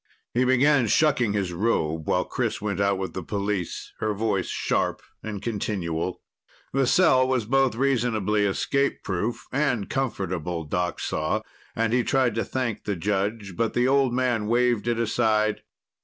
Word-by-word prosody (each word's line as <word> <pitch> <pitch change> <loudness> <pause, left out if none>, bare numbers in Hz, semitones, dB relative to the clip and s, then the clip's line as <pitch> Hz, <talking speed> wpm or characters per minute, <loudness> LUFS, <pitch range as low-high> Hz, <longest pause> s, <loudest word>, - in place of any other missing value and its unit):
He 125 +1 +2
began 130 0 +4
shucking 125 -6 +3
his 95 -4 -1
robe 80 -6 0
while - - +1
Chris - - -2
went 100 -2 -3
out 100 -1 +2
with 95 0 -4
the 95 - -4
police, 100 -1 -3
her 110 -1 -1
voice 100 -3 0
sharp - - -1 0.2
and 105 -3 -6
continual. 95 -6 -3 0.5
The 135 -1 +2
cell 130 -6 +4
was 130 -4 0
both 135 0 +2
reasonably 115 -5 +1
escape 140 +8 0
proof 105 +5 -2
and 130 -7 0
comfortable, 90 - -2
Doc 90 +3 -2
saw, - - -1 0.3
and 115 0 0
he 125 0 +3
tried 130 -2 +2
to 115 - -1
thank 125 -5 -3
the 105 - -1
judge. 100 +2 -2
But 115 +1 -1
the 125 +1 +3
old 135 -1 +3
man 120 -4 0
waved 120 -1 +2
it 120 -1 +1
aside. 110 -2 +1
110 Hz, 155 wpm, -25 LUFS, 100-125 Hz, 0.5 s, began